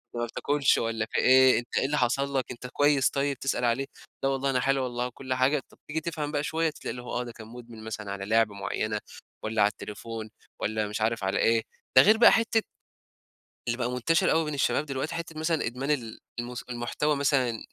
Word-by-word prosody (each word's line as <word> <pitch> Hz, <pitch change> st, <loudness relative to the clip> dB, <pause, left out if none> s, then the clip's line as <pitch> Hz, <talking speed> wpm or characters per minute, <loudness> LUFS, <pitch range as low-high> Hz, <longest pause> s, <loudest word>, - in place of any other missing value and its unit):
ما 120 Hz, 0 st, -1 dB
بتاكلش 140 Hz, +4 st, +1 dB
والّا 115 Hz, -1 st, -1 dB
في -, -, +1 dB
إيه، 130 Hz, -1 st, +6 dB
أنت 120 Hz, -, -5 dB
إيه -, -, +2 dB
اللي 150 Hz, +2 st, 0 dB
حصل 135 Hz, +2 st, +1 dB
لك، 130 Hz, -, -2 dB
أنت 125 Hz, +1 st, -7 dB
كويس 145 Hz, +1 st, +3 dB
طيب؟" 140 Hz, 0 st, -1 dB
تسأل 130 Hz, -2 st, 0 dB
عليه 120 Hz, +4 st, +1 dB, 0.4 s
لا 135 Hz, -, +3 dB
والله 135 Hz, 0 st, 0 dB
أنا 130 Hz, -, +2 dB
حلو 135 Hz, +1 st, +1 dB
والله 125 Hz, -1 st, -2 dB
وكل 130 Hz, +1 st, -5 dB
حاجة. 130 Hz, +3 st, +2 dB
طب، -, -, -21 dB
تيجي 160 Hz, +1 st, -2 dB
تفْهم 150 Hz, -2 st, -3 dB
بقى 145 Hz, -1 st, -1 dB
شوية 160 Hz, +1 st, 0 dB
ده -, -, -10 dB
تلاقي 125 Hz, -, -4 dB
آه، 125 Hz, 0 st, -3 dB
ده 120 Hz, -, -7 dB
كان 110 Hz, -1 st, -12 dB
مدمن 115 Hz, -1 st, -11 dB
مثلًا 110 Hz, -2 st, -5 dB
على 100 Hz, 0 st, -5 dB
لعبة 110 Hz, 0 st, +2 dB
معينة 105 Hz, +1 st, -2 dB, 0.4 s
والّا 110 Hz, 0 st, 0 dB
على 100 Hz, -, +6 dB
التليفون 110 Hz, +1 st, -7 dB, 0.3 s
والّا 110 Hz, 0 st, -1 dB
مش 105 Hz, +1 st, -4 dB
عارف 110 Hz, -1 st, 0 dB
على 95 Hz, +1 st, 0 dB
إيه. 115 Hz, 0 st, +3 dB, 0.3 s
ده 130 Hz, -, +11 dB
غير 215 Hz, +7 st, +6 dB
بقى 235 Hz, -, +8 dB
حتة 225 Hz, -1 st, +2 dB, 1.1 s
اللي 120 Hz, +1 st, 0 dB
بقى 120 Hz, -1 st, -1 dB
منتشر 125 Hz, +7 st, +2 dB
أوي 160 Hz, 0 st, +2 dB
بين 150 Hz, -, -3 dB
الشباب 145 Hz, +2 st, +1 dB
دلوقتي، 135 Hz, +3 st, -3 dB
حتة 165 Hz, -1 st, -5 dB
مثلًا 160 Hz, 0 st, 0 dB
إدمان 125 Hz, +4 st, -3 dB
ال 120 Hz, -7 st, -2 dB, 0.2 s
الم 120 Hz, +1 st, -6 dB, 0.2 s
المحتوى 125 Hz, +5 st, -1 dB
مثلًا 130 Hz, -5 st, +1 dB
125 Hz, 215 wpm, -27 LUFS, 115-145 Hz, 1.1 s, ده